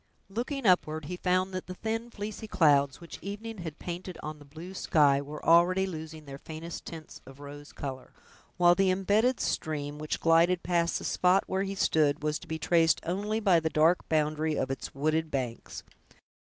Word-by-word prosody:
Looking 245 +6 -3
upward, 160 -5 +2
he 180 - -4
found 185 +1 0
that 185 - -5
the 185 - -6
thin 225 +3 -3
fleecy 215 0 -6
clouds, 140 -7 +3
which 170 - -10
evening 210 +2 -6
had 160 -3 -6
painted 180 +1 -6
on 155 0 -6
the 145 - -14
blue 160 +6 -10
sky, 145 -6 +3
were 150 +2 -8
already 175 +3 +5
losing 160 -3 -7
their 140 -1 -9
faintest 160 +2 -8
tints 160 -2 -9
of 135 +1 -13
rose 145 +1 -10
color, 130 -2 -7 0.5
while 175 -1 +6
the 195 +1 +2
imbedded 205 +7 +2
stream, 150 -1 -2
which 155 0 -3
glided 170 +2 +3
past 170 -1 +1
the - - -7
spot 185 +2 +3
where 190 0 -1
he 195 0 -3
stood, 150 -6 +2
was 150 +1 0
to - - -13
be 160 - -3
traced 165 0 +3
only 205 +5 -1
by 190 -6 +4
the 160 0 -1
dark 160 +3 +2
boundary 155 0 +1
of 130 - -1
its 135 - -6
wooded 155 +3 0
banks. 125 -5 -4
165 Hz, 185 wpm, -29 LUFS, 150-185 Hz, 0.5 s, while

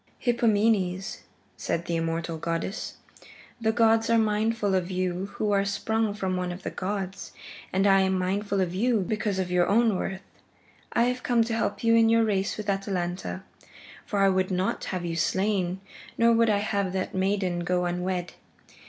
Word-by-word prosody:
"Hippomenes," 215 -5 +1 0.4
said 170 - -2
the 170 - -2
immortal 165 0 -2
goddess, 165 +5 -3 0.7
"the 220 -1 +2
gods 225 0 +3
are 230 - +4
mindful 215 -1 +1
of 185 -1 0
you 185 0 -2
who 210 -1 0
are 200 -1 +3
sprung 210 +1 -1
from 190 -2 -2
one 180 -1 -2
of 180 +2 -8
the - - -4
gods, 195 0 -4 0.4
and 190 +1 +1
I 195 -1 +5
am 190 0 +1
mindful 195 +2 -1
of 180 -2 -1
you 225 +3 +2
because 210 +1 -1
of 185 -1 -2
your 180 -1 +3
own 225 0 +3
worth. 190 +1 -4 0.7
I 235 - +3
have 250 +1 0
come 240 -2 +2
to 225 0 -3
help 230 - -2
you 230 0 +4
in 225 -1 +5
your 230 0 +4
race 200 -3 0
with 210 -1 -6
Atalanta, 190 -2 -2 0.6
for 205 - -4
I 195 - +5
would 185 0 +1
not 185 0 -1
have 180 -2 -3
you 165 -1 -3
slain, 190 +1 0 0.4
nor 230 0 +5
would 230 0 +4
I 210 - +3
have 200 -2 -1
that 190 -1 -2
maiden 190 -2 0
go 180 +1 0
unwed. 180 0 -2
195 Hz, 180 wpm, -26 LUFS, 185-220 Hz, 0.7 s, I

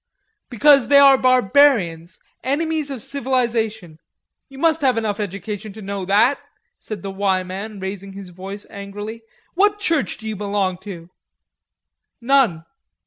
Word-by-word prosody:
"Because 275 +2 +4
they 285 - +5
are 280 -1 +8
barbarians, 250 - +2 0.2
enemies 305 +3 -1
of 265 -5 -5
civilization. 230 - -2 0.5
You 270 - -13
must 325 +2 +1
have 260 -4 +2
enough 220 -2 -2
education 205 +1 -5
to 220 - -11
know 195 -1 -4
that," 210 +8 +3 0.4
said 210 -5 -7
the 195 - -4
"Y" 190 -1 0
man, 195 +3 -7
raising 195 0 -6
his 195 -1 -9
voice 195 +3 -8
angrily. 205 +3 -7 0.3
"What 410 +3 +2
church 330 -8 0
do 220 - -9
you 220 - -3
belong 200 -2 -2
to?" 175 -2 -9 1.1
"None." 235 -10 +2
215 Hz, 140 wpm, -20 LUFS, 195-270 Hz, 1.1 s, are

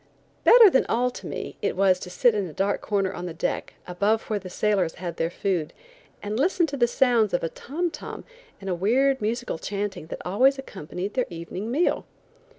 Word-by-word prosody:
Better 470 -2 +9
than 265 - +3
all 250 +2 +1
to - - -9
me, - - -6
it - - -1
was 185 -1 +3
to 180 - -8
sit 235 +6 +3
in 205 -3 -1
a 160 - -10
dark 195 +3 0
corner 195 -2 0
on 180 0 -5
deck, 165 - -3
above 205 +5 +1
where 215 -2 -2
the 185 -1 -9
sailors 190 -3 0
had 175 -1 -6
their 165 - 0
food, 175 -3 -2 0.5
and 210 +3 -2
listen 345 +3 +3
to 290 -3 -5
the 240 -3 +3
sounds 235 -5 +3
of - - -1
a 165 - 0
tom 335 - -3
tom - - -8 0.4
and 195 - -9
a 185 - 0
weird 255 +9 +2
musical 225 -4 -2
chanting 200 -4 -4
that - - -6
always 255 +10 +3
accompanied 195 - -6
their 255 - 0
evening 175 +5 -6
meal. 300 +9 +1
205 Hz, 200 wpm, -25 LUFS, 180-250 Hz, 0.5 s, Better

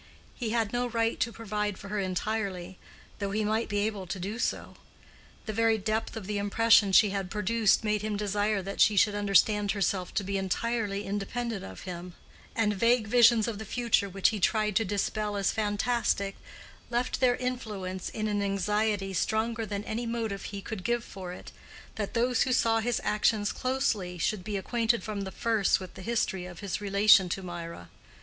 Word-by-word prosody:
He 235 -4 -4
had 225 -2 0
no 245 0 0
right 230 -1 0
to 235 - 0
provide 210 -3 -3
for 200 - -10
her 210 0 -1
entirely, 190 -1 -3 0.4
though 200 -1 -2
he 215 +2 0
might 220 +2 0
be 205 0 +1
able 205 -4 -4
to 190 +2 -4
do 205 +6 -4
so; - - -2 0.7
the 215 - -3
very 225 0 +3
depth 220 +2 -2
of 215 - -6
the 205 +1 -2
impression 205 0 +4
she 205 +1 +6
had 195 -2 -3
produced 210 +1 +2
made 210 -1 0
him 210 -1 -2
desire 205 0 0
that 195 +2 -3
she 210 -1 +5
should 210 +2 +4
understand 205 0 +3
herself 195 -3 -1
to 205 - +1
be 195 +1 -2
entirely 205 +1 -1
independent 205 +2 -3
of 95 - -9
him; 180 -1 -7 0.4
and 215 -2 +2
vague 230 +3 +3
visions 235 0 +5
of 220 -3 -4
the - - -5
future 220 -2 +1
which 195 0 +2
he 215 - -3
tried 210 +1 +1
to 225 - +3
dispel 205 +1 -1
as 200 -2 +1
fantastic 210 -1 0 0.5
left 240 +1 -1
their 250 -2 +4
influence 210 -8 -4
in 215 0 -3
an 205 -1 0
anxiety 200 0 0
stronger 220 +4 0
than 205 0 -3
any 230 +2 -3
motive 225 -4 -3
he 200 -1 -6
could 215 -4 -6
give 240 +1 0
for 185 -5 -8
it, 180 - -10 0.4
that 210 0 -4
those 245 +2 +2
who 260 - +2
saw 225 -2 +3
his 235 +1 0
actions 210 0 +1
closely 220 -9 -1
should 185 +3 -1
be 205 +1 -3
acquainted 230 +3 0
from 205 -3 -4
the 190 - -6
first 225 -3 +2
with 185 -1 -9
the - - -10
history 195 -4 -1
of 175 - -10
his 200 0 -3
relation 200 -2 +5
to 190 +2 -3
Mirah. 170 - -7
210 Hz, 190 wpm, -29 LUFS, 195-225 Hz, 0.7 s, she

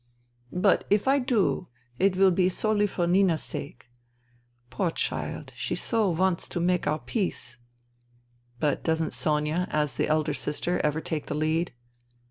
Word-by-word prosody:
" 120 0 -36 0.2
But - - +4
if 205 +4 +2
I 275 +1 +4
do, 240 -7 +1 0.3
it 190 -1 +3
will 190 0 +6
be 180 +1 +3
solely 210 +2 +1
for 180 -3 -1
Nina's 175 -2 +3
sake. 140 -4 -7 0.9
Poor 170 +7 0
child, - - -3
she - - -2
so 225 -4 0
wants 180 +1 0
to - - -3
make 180 +1 +1
our 155 - +2
peace." 185 - -3 0.5
" 120 0 -36
But 150 -3 0
doesn't 160 -1 0
Sonia, 155 +4 0
as 150 -3 0
the - - +1
eldest 155 -3 0
sister, 165 +4 -1
ever 150 +1 +1
take 155 -3 -4
the - - -3
lead 160 +3 0
165 Hz, 160 wpm, -27 LUFS, 150-190 Hz, 0.9 s, will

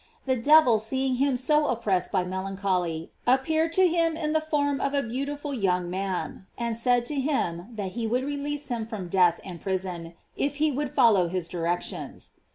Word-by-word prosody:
The 260 -1 +2
devil 255 -2 +5
seeing 260 +3 -1
him 270 -1 +2
so 300 +4 +2
oppressed 205 -8 0
by 185 -3 +1
melancholy, 185 -3 -2 0.2
appeared 315 +6 +2
to 375 +1 +5
him 330 -1 +1
in 305 -2 -1
the 315 - +2
form 285 -3 0
of 275 +1 0
a 280 - +2
beautiful 280 +4 -4
young 180 -6 0
man, 190 0 -4
and 235 -1 -2
said 245 +1 +2
to 290 +2 -2
him 200 - -1
that 200 -3 -4
he 230 +2 -3
would 250 +3 0
release 290 0 -3
him 230 -3 -3
from 200 -6 -6
death 175 -2 +3
and 175 -3 -8
prison, 180 -3 -4 0.2
if 285 0 -1
he 305 +1 +2
would 290 +1 -2
follow 220 -9 +5
his 180 -1 -2
directions. 175 0 -4
240 Hz, 180 wpm, -26 LUFS, 190-285 Hz, 0.2 s, devil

